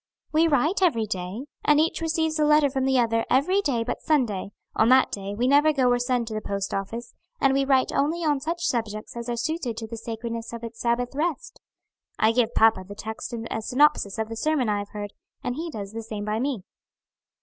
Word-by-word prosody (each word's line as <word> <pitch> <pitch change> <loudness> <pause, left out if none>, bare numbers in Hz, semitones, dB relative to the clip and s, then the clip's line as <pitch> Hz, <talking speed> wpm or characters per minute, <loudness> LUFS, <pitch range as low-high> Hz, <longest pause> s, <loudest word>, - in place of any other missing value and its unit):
"We 320 +2 +4
write 310 +6 +2
every 270 -12 +3
day, 195 +4 -4 0.2
and 300 0 +4
each 320 +2 +1
receives 320 -1 0
a - - +4
letter 300 -2 +4
from 265 -1 0
the 265 -1 +3
other 230 -2 +2
every 365 +10 +3
day 255 -10 0
but 230 - -4
Sunday; 240 - 0 0.3
on 220 - +4
that 260 +1 +5
day 200 0 -4
we 245 +4 +1
never 290 +3 +5
go 260 -4 +2
or 245 - +2
send 245 -1 0
to - - -5
the 215 - -3
post 200 -1 -3
office; 225 +5 -4 0.3
and 270 -1 +3
we 275 0 +2
write 265 -1 +3
only 320 +5 0
on 295 -2 +2
such 335 +4 -3
subjects 215 -3 -2
as 235 0 -5
are 240 - -2
suited 250 -3 -2
to 225 - -4
the 230 +1 -7
sacredness 230 +1 -5
of 235 0 -7
its 230 0 -8
Sabbath 240 +1 0
rest. 340 - -3 0.6
I 220 - +4
give 235 0 +1
papa 220 -4 +4
the 200 +2 -10
text 220 +4 -6
and 230 -1 -5
a 220 - -2
synopsis 250 -4 +2
of 220 0 -1
the 225 - -6
sermon 270 -1 +1
I 205 -1 +1
have 205 0 -6
heard, 205 -1 -6 0.3
and 245 - -1
he 325 +6 -4
does 205 -8 -6
the 225 +1 -5
same 215 -2 -6
by 215 +1 -1
me." 255 -6 -2
240 Hz, 225 wpm, -25 LUFS, 220-290 Hz, 0.6 s, that